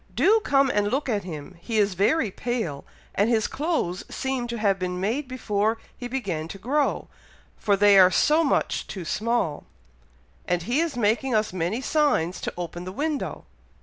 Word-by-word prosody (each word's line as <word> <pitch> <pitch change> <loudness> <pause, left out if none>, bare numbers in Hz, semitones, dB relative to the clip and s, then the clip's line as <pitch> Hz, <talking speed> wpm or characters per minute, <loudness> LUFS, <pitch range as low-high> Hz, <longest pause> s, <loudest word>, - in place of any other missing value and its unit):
Do 440 +3 +5
come 275 -2 +3
and 205 0 +1
look 275 +6 -1
at 205 -5 -1
him! 165 +1 -8
he 225 +2 -2
is 205 -2 +3
very 210 - +2
pale, 210 - -3 0.3
and 205 +3 +2
his 225 -3 +2
clothes 290 - -1
seem 265 -2 -2
to 235 0 -4
have 200 -3 +1
been 180 -1 -3
made 235 +9 -1
before 220 -3 0 0.2
he 245 - -6
began 195 -12 -3
to 195 - -8
grow, 275 +8 0 0.5
for 205 - +2
they 200 0 +6
are 185 -1 +8
so 305 - +3
much 290 - 0
too 185 -4 -6
small, 215 -5 -1 0.8
and 175 -1 0
he 245 - 0
is 330 -5 -1
making 235 +3 +1
us 215 -3 +1
many 185 +7 -1
signs 270 - +1
to - - -3
open 175 0 -5
the 185 - -6
window. 295 +7 -3
215 Hz, 180 wpm, -25 LUFS, 185-265 Hz, 0.8 s, are